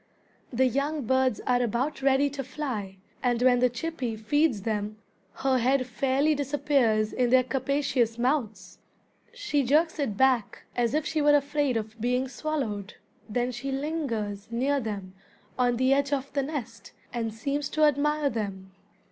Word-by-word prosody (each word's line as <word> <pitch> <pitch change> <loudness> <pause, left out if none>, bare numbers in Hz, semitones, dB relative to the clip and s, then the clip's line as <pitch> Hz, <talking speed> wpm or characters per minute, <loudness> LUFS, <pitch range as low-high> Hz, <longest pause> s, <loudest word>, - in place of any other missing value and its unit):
The 260 +1 +2
young 280 +2 -1
birds 260 -1 +2
are 250 -1 +2
about 245 +5 -1
ready 270 +1 +3
to 275 -1 -4
fly, 240 -8 -5 0.2
and 245 -2 +1
when 250 -1 +5
the 250 0 +4
chippy 245 -2 -3
feeds 225 0 +1
them 215 -1 -2 0.4
her 265 -1 +1
head 255 +2 +2
fairly 270 +5 +1
disappears 275 -6 +1
in 250 -1 +1
their 255 +1 +5
capacious 255 -2 0
mouths. 245 -3 -1 0.5
She 475 -12 -1
jerks 305 +5 +2
it 230 -9 -1
back 260 -5 +2
as 240 +2 +1
if 305 - 0
she 315 -1 0
were 295 0 +5
afraid 285 -3 +1
of 220 0 -6
being 250 +2 +1
swallowed. 250 -8 -3 0.3
Then 245 +3 0
she 260 +3 -5
lingers 260 -9 -3
near 265 +5 +1
them 200 -6 -5 0.4
on 245 -1 +2
the 260 +2 +3
edge 280 0 +1
of 280 -1 -2
the 280 - +1
nest, 265 -8 -6 0.2
and 230 -2 -2
seems 280 +6 -2
to 310 - +1
admire 295 0 +2
them. 195 -4 -5
260 Hz, 155 wpm, -27 LUFS, 230-285 Hz, 0.5 s, when